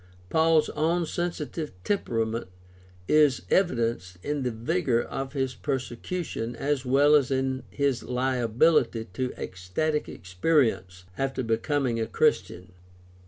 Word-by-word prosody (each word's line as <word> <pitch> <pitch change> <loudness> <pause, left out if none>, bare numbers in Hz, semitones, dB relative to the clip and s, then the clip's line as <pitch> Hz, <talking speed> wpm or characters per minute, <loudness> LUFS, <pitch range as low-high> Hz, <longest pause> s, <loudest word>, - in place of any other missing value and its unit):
Paul's 160 -1 +4
own 165 +3 0
sensitive 165 - -4
temperament 115 - -1 0.6
is 150 -4 +4
evidenced 115 - +1
in 145 -1 -2
the 125 - 0
vigor 120 +3 0
of 135 0 -5
his 130 -2 -1
persecution 120 - -4
as 140 +2 -1
well 140 +3 +4
as 145 -4 +4
in 130 -1 0
his 140 -4 0
liability 125 0 +1
to 125 +6 -2
ecstatic 95 +13 -2
experience 95 - 0 0.2
after 135 -1 -1
becoming 120 +1 0
a 110 - -1
Christian. 90 -4 0
130 Hz, 115 wpm, -27 LUFS, 115-150 Hz, 0.6 s, Paul's